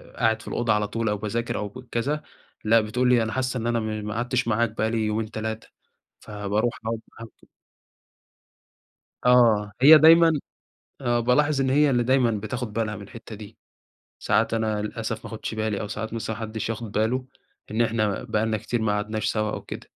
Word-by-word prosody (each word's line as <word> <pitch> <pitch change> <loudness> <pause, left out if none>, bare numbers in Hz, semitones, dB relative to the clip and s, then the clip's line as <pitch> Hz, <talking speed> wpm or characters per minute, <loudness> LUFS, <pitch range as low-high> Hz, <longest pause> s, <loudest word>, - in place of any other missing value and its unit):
قاعد 110 -1 +1
في - - -14
الأوضة 115 -2 0
على 105 -1 0
طول 115 +1 -2
أو 105 - 0
باذاكر 115 +3 -3
أو 105 -1 -3
ك 125 +4 -12
كذا، 145 +6 -1 0.4
لأ، 110 +1 +4
بتقول 125 +4 0
لي 120 -2 +4
أنا 110 - -3
حاسّة 130 0 -1
إن 115 0 -3
أنا 120 -1 +1
م 110 -1 -4
ما 105 - -3
قعدتش 120 +2 -1
معاك 115 0 +1
بقى 110 +1 0
لي 110 -1 0
يومين، 110 +1 -2
3 110 0 -5 0.5
فباروح 105 +3 -2
أقعد 115 0 -2
معاهم 115 - -10
ط - - -20 1.8
آه، 115 -4 +5
هي 155 +4 +10
دايمًا 165 +2 +7 0.7
آه، 120 -2 +1
بالاحظ 135 +4 +2
إن 130 -1 +1
هي 145 +1 +4
اللي 120 -2 +2
دايمًا 130 -1 +3
بتاخد 110 +2 -4
بالها 110 -1 -2
من 100 - -9
الحِتّة 110 +2 -10
دي، 105 +1 -11 0.6
ساعات 110 +2 +1
أنا 110 -2 -1
للأسف 110 +1 -4
ما - - -6
آخُدش 110 0 -5
بالي، 110 -2 -2
أو 105 - -4
ساعات 110 +1 -5
مثلًا 110 -1 -3
ما - - -10
حدش 110 0 -4
ياخد 115 -1 -5
بالُه، 115 +5 0 0.5
إن 110 +2 +1
إحنا 110 -3 0
بقى 110 +1 0
لنا 110 -1 0
كتير 115 +2 -2
ما 105 - +1
قعدناش 105 +1 -2
سوا 105 -1 -1
أو - - -5
كده. - - -9
110 Hz, 200 wpm, -25 LUFS, 110-120 Hz, 1.8 s, هي